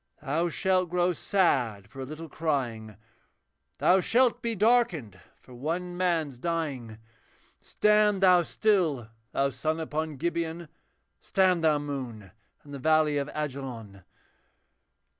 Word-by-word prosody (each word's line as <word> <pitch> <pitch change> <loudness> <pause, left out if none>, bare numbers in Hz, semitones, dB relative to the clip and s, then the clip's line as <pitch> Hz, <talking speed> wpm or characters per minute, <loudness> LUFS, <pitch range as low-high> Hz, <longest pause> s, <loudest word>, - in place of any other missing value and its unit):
Thou 165 +5 -1
shalt 185 +1 +1
grow 180 +1 +1
sad 130 - 0
for 135 - -13
a 130 - -4
little 155 +4 -8
crying, 120 -10 -3 0.8
Thou 185 +1 +4
shalt 245 +3 +3
be 230 -1 -2
darkened 195 - +2 0.2
for 130 - -17
one 170 +8 -3
man's 165 -8 -1
dying 140 -9 -3 0.6
Stand 210 -2 +2
thou 180 -2 +6
still, 170 - 0 0.2
thou 140 0 +1
sun 155 +5 -2
upon 155 -1 -3
Gibeon, 170 +1 -3 0.5
Stand 185 -4 +2
thou, 155 -2 +4
moon, 130 -9 -6 0.3
in 145 - -13
the 140 - -6
valley 155 0 +3
of 140 +1 -3
Ajalon!' 130 -9 -6
155 Hz, 120 wpm, -28 LUFS, 135-180 Hz, 0.8 s, thou